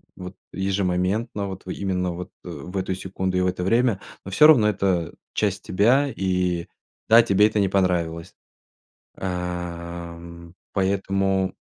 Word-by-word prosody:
вот 90 Hz, +1 st, -8 dB, 0.2 s
ежемоментно, 95 Hz, +2 st, -1 dB
вот, 95 Hz, -1 st, -8 dB
в 95 Hz, -, -8 dB
именно 90 Hz, -2 st, -1 dB
вот, 90 Hz, +1 st, -6 dB
э, -, -, -8 dB
в 85 Hz, +4 st, -7 dB
эту 95 Hz, 0 st, -1 dB
секунду 95 Hz, 0 st, -3 dB
и -, -, +2 dB
в 90 Hz, -, +2 dB
это 90 Hz, 0 st, -2 dB
время, 115 Hz, +1 st, +2 dB, 0.3 s
но 95 Hz, -, -7 dB
всё 150 Hz, +10 st, +7 dB
равно 120 Hz, -9 st, +6 dB
это 95 Hz, -5 st, 0 dB, 0.2 s
часть 100 Hz, -2 st, -1 dB
тебя. 125 Hz, +9 st, +3 dB
И 90 Hz, -2 st, 0 dB, 0.4 s
да, 115 Hz, +2 st, +9 dB
тебе 105 Hz, -2 st, +4 dB
это 110 Hz, -1 st, -1 dB
не 100 Hz, -2 st, +2 dB
понравилось. 85 Hz, -4 st, 0 dB, 0.8 s
Ам, 85 Hz, -1 st, -6 dB, 0.2 s
поэтому 95 Hz, 0 st, 0 dB
95 Hz, 145 wpm, -24 LUFS, 90-100 Hz, 0.8 s, да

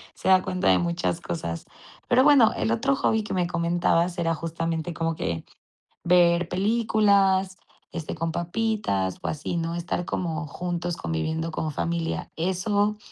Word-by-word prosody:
se -, -, -6 dB
da 185 Hz, -1 st, +6 dB
cuenta 185 Hz, 0 st, -1 dB
de 90 Hz, -1 st, +5 dB
muchas 85 Hz, 0 st, -1 dB
cosas. 85 Hz, -1 st, -4 dB, 0.4 s
Pero, 250 Hz, +1 st, +5 dB
bueno, 280 Hz, -6 st, +6 dB
el 225 Hz, -, 0 dB
otro 270 Hz, +5 st, +2 dB
hobby 220 Hz, -5 st, +1 dB
que 210 Hz, -, -5 dB
me 180 Hz, -2 st, +1 dB
comentabas 170 Hz, +1 st, +1 dB
era 165 Hz, -1 st, +1 dB
justamente 165 Hz, 0 st, -3 dB
como 165 Hz, 0 st, -1 dB
que 85 Hz, -, -3 dB, 0.6 s
ver 175 Hz, -1 st, +4 dB
películas, 195 Hz, -1 st, +2 dB, 0.3 s
este, 165 Hz, -2 st, -5 dB
con 165 Hz, +1 st, -2 dB
papitas, 175 Hz, -, -1 dB
o -, -, -4 dB
así, 155 Hz, +3 st, -3 dB
¿no? 165 Hz, 0 st, -2 dB
Estar 175 Hz, +1 st, -3 dB
como 165 Hz, -3 st, -3 dB
juntos, 175 Hz, +2 st, -3 dB
conviviendo 160 Hz, -, -2 dB
como 155 Hz, -1 st, -3 dB
familia. 165 Hz, +2 st, -2 dB
¿Eso 205 Hz, +4 st, 0 dB
170 Hz, 150 wpm, -25 LUFS, 160-190 Hz, 0.6 s, da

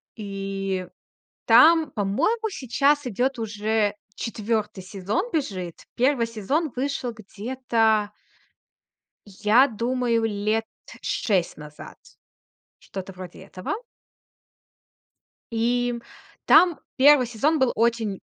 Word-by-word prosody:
И 195 Hz, -3 st, -4 dB, 0.6 s
там, 325 Hz, -1 st, +6 dB
по-моему, 320 Hz, -, 0 dB
сейчас 285 Hz, -, +1 dB
идёт 250 Hz, +3 st, -1 dB
уже 215 Hz, -1 st, 0 dB, 0.2 s
четвёртый 215 Hz, -3 st, -3 dB
сезон 200 Hz, -, -3 dB
бежит. 185 Hz, -, -3 dB
Первый 250 Hz, -2 st, +2 dB
сезон 255 Hz, -, -1 dB
вышел 255 Hz, -2 st, -2 dB
где-то... 220 Hz, 0 st, 0 dB, 1.3 s
я 225 Hz, +6 st, +5 dB
думаю, 235 Hz, 0 st, 0 dB
лет 215 Hz, +1 st, -1 dB, 0.4 s
6 190 Hz, -6 st, 0 dB
назад. 150 Hz, 0 st, -11 dB, 0.8 s
Что-то 190 Hz, 0 st, -8 dB
вроде 180 Hz, -1 st, -10 dB
этого. 185 Hz, -1 st, -5 dB, 1.8 s
И 240 Hz, +1 st, 0 dB, 0.5 s
там 350 Hz, -3 st, +6 dB, 0.2 s
1 280 Hz, -1 st, +6 dB
сезон 290 Hz, +7 st, +1 dB
был 260 Hz, -2 st, +3 dB
очень 225 Hz, -3 st, 0 dB
225 Hz, 90 wpm, -24 LUFS, 205-260 Hz, 1.8 s, там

